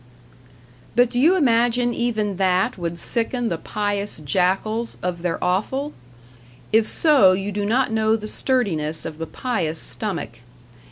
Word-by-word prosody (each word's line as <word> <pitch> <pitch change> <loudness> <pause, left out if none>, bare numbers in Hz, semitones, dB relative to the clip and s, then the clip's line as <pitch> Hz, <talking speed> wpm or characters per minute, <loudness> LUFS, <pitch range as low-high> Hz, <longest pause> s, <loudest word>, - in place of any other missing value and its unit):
But 245 0 +3
do 245 - -1
you 330 +8 +5
imagine 240 -5 +2
even 215 -5 -1
that 185 0 +1
would 170 -2 -4
sicken 235 +4 -1
the 170 - -3
pious 205 -1 -3
jackals 195 - -1
of 175 -1 -3
their 175 -1 -1
offal? 260 +11 -1 0.8
If 220 0 +4
so, 275 - +5
you 195 +2 -3
do 205 0 -2
not 250 +2 +1
know 220 0 +2
the 215 -1 -5
sturdiness 170 - -1
of 155 - -7
the 165 - -4
pious 185 -11 -2
stomach. 160 - -1
210 Hz, 145 wpm, -22 LUFS, 180-240 Hz, 0.8 s, you